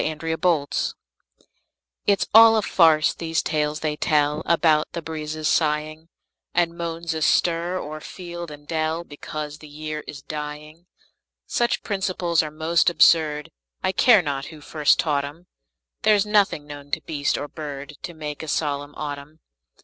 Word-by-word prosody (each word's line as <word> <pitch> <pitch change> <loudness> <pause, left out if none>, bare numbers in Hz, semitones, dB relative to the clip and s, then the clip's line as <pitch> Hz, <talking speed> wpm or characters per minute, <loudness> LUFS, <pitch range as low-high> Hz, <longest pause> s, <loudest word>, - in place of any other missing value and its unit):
MERRY 160 +1 -2
AUTUMN 160 -3 0 1.1
It's 200 -2 +3
all 225 0 +9
a 215 - +1
farce, 160 -5 +4
these 165 -1 -2
tales 150 -1 -1
they 155 -1 -1
tell 150 0 +1
About 160 -2 +3
the 170 - -4
breezes 155 -1 -4
sighing, 155 +1 0 0.5
And 170 -1 +2
moans 170 -1 -3
astir 170 +3 +1
o'er 155 -3 -6
field 175 -1 -8
and 145 0 -12
dell, 160 +1 -1
Because 150 -1 -7
the 155 - -12
year 155 +1 -6
is 140 -2 -8
dying. 150 +2 -7 0.6
Such 240 -1 0
principles 185 -4 0
are 155 - -4
most 160 +3 +2
absurd, 155 -3 +3 0.3
I - - +2
care 215 -1 +5
not 140 -2 -3
who 155 - -10
first 150 0 +2
taught 145 -3 +1
'em; 150 +5 -9 0.6
There's 210 -1 +4
nothing 205 -8 +2
known 145 -1 -10
to 160 - 0
beast 145 -2 -1
or 145 - -4
bird 145 -2 -7
To 175 - -7
make 150 -2 -6
a 160 - -7
solemn 145 -1 -2
autumn. 145 +1 -7
155 Hz, 150 wpm, -23 LUFS, 150-170 Hz, 1.1 s, all